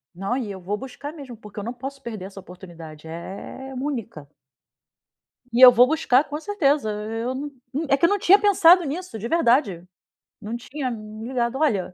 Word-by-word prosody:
Não, 195 Hz, +7 st, -2 dB
e 230 Hz, -6 st, -4 dB
eu 190 Hz, -, -8 dB
vou 200 Hz, +4 st, -3 dB
buscar 265 Hz, +4 st, -8 dB
mesmo, 275 Hz, -7 st, -10 dB
porque 210 Hz, -1 st, -10 dB
eu -, -, -5 dB
não 235 Hz, +3 st, -4 dB
posso 270 Hz, +3 st, -8 dB
perder 220 Hz, -7 st, -7 dB
essa 195 Hz, 0 st, -10 dB
oportunidade, 170 Hz, -4 st, -12 dB
é 195 Hz, +10 st, -8 dB
única. 250 Hz, -, -5 dB, 1.2 s
E 240 Hz, -, +1 dB
eu 255 Hz, -1 st, +12 dB
vou 245 Hz, +1 st, +5 dB
buscar 295 Hz, -3 st, +3 dB
com 295 Hz, 0 st, -6 dB
certeza. 300 Hz, -, +1 dB
Eu 225 Hz, +4 st, -4 dB
n 285 Hz, +2 st, -5 dB, 0.2 s
n 305 Hz, +4 st, -2 dB
é 275 Hz, -, +4 dB
que 280 Hz, -, +3 dB
eu -, -, +4 dB
não 410 Hz, -, +1 dB
tinha 390 Hz, +2 st, +6 dB
pensado 370 Hz, -3 st, +6 dB
nisso. 320 Hz, -3 st, -5 dB
De 225 Hz, -, -4 dB
verdade. 240 Hz, -, +2 dB, 0.6 s
Não 215 Hz, +3 st, -5 dB
tinha 255 Hz, +2 st, -5 dB
me 215 Hz, 0 st, -8 dB
ligado. 245 Hz, 0 st, -1 dB
Olha 220 Hz, -12 st, 0 dB
245 Hz, 190 wpm, -23 LUFS, 210-290 Hz, 1.2 s, eu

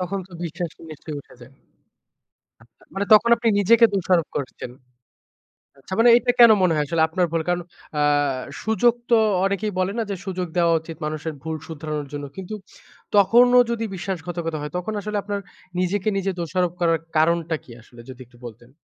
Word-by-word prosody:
তখন 185 Hz, +2 st, -3 dB
তো -, -, -20 dB
বিশ্বাসটা 170 Hz, 0 st, -6 dB
নিশ্চয়ই 155 Hz, 0 st, -8 dB
উঠে -, -, -19 dB
যায়। 120 Hz, +2 st, -14 dB, 1.1 s
আচ্ছা 115 Hz, 0 st, -27 dB
মানে 195 Hz, +1 st, -1 dB
তখন 235 Hz, +2 st, +5 dB
আপনি 235 Hz, 0 st, 0 dB
নিজেকে 230 Hz, +4 st, +5 dB
দোষারোপ 180 Hz, -3 st, +1 dB
করছেন। 130 Hz, -3 st, -5 dB, 1.1 s
আচ্ছা 160 Hz, -, -9 dB
মানে 235 Hz, +1 st, +6 dB
এইটা 245 Hz, +1 st, +3 dB
কেন 235 Hz, -2 st, +9 dB
মনে 175 Hz, -3 st, +3 dB
হয় 150 Hz, -1 st, 0 dB
আসলে 165 Hz, +2 st, 0 dB
আপনার 180 Hz, +3 st, 0 dB
ভুল 165 Hz, -1 st, 0 dB
কারণ 175 Hz, 0 st, 0 dB, 0.4 s
আ -, -, +2 dB, 0.6 s
সুযোগ 230 Hz, +2 st, +3 dB, 0.2 s
তো 235 Hz, -, +7 dB, 0.3 s
অনেকেই 200 Hz, +2 st, -1 dB
বলে 185 Hz, +1 st, 0 dB
না 230 Hz, -, 0 dB
যে -, -, -2 dB
সুযোগ 185 Hz, -2 st, -3 dB
দেওয়া 170 Hz, -1 st, +3 dB
উচিত 160 Hz, -1 st, -10 dB
মানুষের 155 Hz, +1 st, -4 dB
ভুল 160 Hz, 0 st, -3 dB
শুধরানোর 150 Hz, -2 st, -5 dB
জন্য। 145 Hz, 0 st, -5 dB
কিন্তু 190 Hz, +3 st, -6 dB, 0.6 s
তখনও 240 Hz, +5 st, +6 dB
যদি 230 Hz, -1 st, -2 dB
বিশ্বাসঘাতকতা 170 Hz, -3 st, -4 dB
হয় 150 Hz, 0 st, -6 dB
তখন 180 Hz, +5 st, -4 dB
আসলে 210 Hz, 0 st, -3 dB
আপনার 205 Hz, 0 st, -3 dB, 0.4 s
নিজেকে 185 Hz, +3 st, 0 dB
নিজে 195 Hz, 0 st, -1 dB
দোষারোপ 175 Hz, +1 st, -1 dB
করার 165 Hz, -1 st, +2 dB, 0.2 s
কারণটা 165 Hz, +1 st, +2 dB
কি -, -, -16 dB
আসলে 120 Hz, +1 st, -15 dB
যদি 130 Hz, 0 st, -10 dB
একটু 120 Hz, 0 st, -22 dB
বলতেন? 120 Hz, +1 st, -11 dB
175 Hz, 175 wpm, -22 LUFS, 155-200 Hz, 1.1 s, কেন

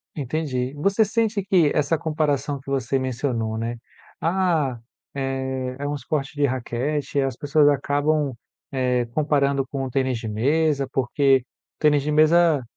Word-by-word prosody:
Entendi. 135 Hz, -2 st, -2 dB
Você 200 Hz, +8 st, +2 dB
sente 215 Hz, -1 st, 0 dB
que 180 Hz, -7 st, +3 dB
essa 150 Hz, +2 st, +1 dB
comparação 150 Hz, -2 st, -1 dB
que 135 Hz, -, -12 dB
você 135 Hz, -1 st, 0 dB
mencionou, 120 Hz, -4 st, -2 dB
né. 115 Hz, +1 st, -3 dB, 0.4 s
"Ah, 165 Hz, -7 st, +1 dB, 0.4 s
eh, 130 Hz, -1 st, -3 dB
é 145 Hz, -, -3 dB
um 145 Hz, -, -2 dB
esporte 140 Hz, 0 st, -3 dB
de 145 Hz, 0 st, +2 dB
raquete, 135 Hz, +3 st, -1 dB
as 135 Hz, -1 st, -1 dB
pessoas 145 Hz, 0 st, +3 dB
acabam, 145 Hz, 0 st, +1 dB, 0.4 s
eh, 125 Hz, -2 st, +1 dB
comparando 140 Hz, -2 st, +1 dB
com 135 Hz, 0 st, -4 dB
o 130 Hz, -, -3 dB
tênis 130 Hz, -1 st, 0 dB
de 115 Hz, -, -6 dB
mesa" 140 Hz, +5 st, +1 dB
porque 135 Hz, 0 st, +2 dB, 0.4 s
tênis 150 Hz, -2 st, +4 dB
de 150 Hz, +2 st, -2 dB
mesa 155 Hz, -2 st, +4 dB
140 Hz, 145 wpm, -23 LUFS, 130-155 Hz, 0.4 s, tênis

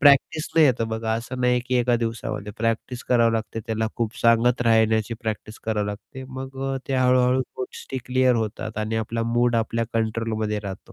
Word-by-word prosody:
प्रॅक्टिसने 150 Hz, +3 st, +4 dB
येतं. 120 Hz, -5 st, +2 dB
बघा, 110 Hz, 0 st, -2 dB
असं 120 Hz, +3 st, -5 dB
नाही 125 Hz, 0 st, +3 dB
आहे 125 Hz, -, +2 dB
की 130 Hz, -, -1 dB
एका 120 Hz, 0 st, +3 dB
दिवसामध्ये. 105 Hz, -2 st, -4 dB
प्रॅक्टिस 115 Hz, +2 st, -1 dB
करावी 115 Hz, -2 st, +4 dB
लागते. 115 Hz, 0 st, -3 dB
त्याला 110 Hz, -1 st, -1 dB
खूप 115 Hz, -1 st, -2 dB
सांगत 115 Hz, +1 st, +4 dB
राहण्याची 110 Hz, -1 st, +3 dB
प्रॅक्टिस 110 Hz, -1 st, -4 dB
करावी 105 Hz, -2 st, 0 dB
लागते. 110 Hz, +6 st, -7 dB
मग 130 Hz, 0 st, -7 dB, 0.2 s
अ, -, -, -1 dB
ते 135 Hz, -, 0 dB
हळू-हळू 125 Hz, 0 st, +4 dB, 0.2 s
गोष्टी 130 Hz, +1 st, -5 dB
क्लिअर 130 Hz, 0 st, +3 dB
होतात 110 Hz, -1 st, -3 dB
आणि 110 Hz, +1 st, -1 dB
आपला 115 Hz, +1 st, -2 dB
मूड 120 Hz, 0 st, +3 dB
आपल्या 115 Hz, +1 st, 0 dB
कंट्रोलमध्ये 110 Hz, -1 st, -1 dB
राहतो. 95 Hz, -1 st, -4 dB
115 Hz, 175 wpm, -24 LUFS, 110-125 Hz, 0.2 s, प्रॅक्टिसने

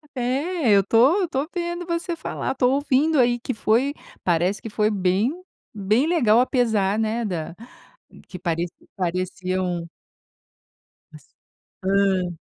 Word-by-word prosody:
É 250 Hz, -, -2 dB, 0.5 s
eu 200 Hz, -, +6 dB
estou 235 Hz, -, +4 dB
eu 380 Hz, -, +1 dB
estou 285 Hz, -3 st, -2 dB
vendo 345 Hz, 0 st, -3 dB
você 340 Hz, 0 st, -2 dB
falar, 315 Hz, -, -4 dB
estou 255 Hz, -1 st, +2 dB
ouvindo 285 Hz, +2 st, +2 dB
aí 240 Hz, -1 st, +3 dB
que 255 Hz, -, -3 dB
foi, 235 Hz, +6 st, +1 dB, 0.3 s
parece 175 Hz, +3 st, +1 dB
que 225 Hz, -, -7 dB
foi 210 Hz, 0 st, +1 dB
bem 195 Hz, +6 st, +1 dB, 0.4 s
bem 215 Hz, +7 st, +1 dB
legal 240 Hz, -10 st, +4 dB
apesar, 225 Hz, -6 st, +1 dB
né, 225 Hz, +2 st, -1 dB
da 170 Hz, -4 st, -4 dB, 0.7 s
que 180 Hz, -, -8 dB
pareci 170 Hz, 0 st, -2 dB, 0.2 s
pareciam. 185 Hz, -1 st, -2 dB, 1.2 s
Mas -, -, -17 dB, 0.5 s
hã. 190 Hz, -2 st, +1 dB
215 Hz, 130 wpm, -23 LUFS, 185-265 Hz, 1.2 s, eu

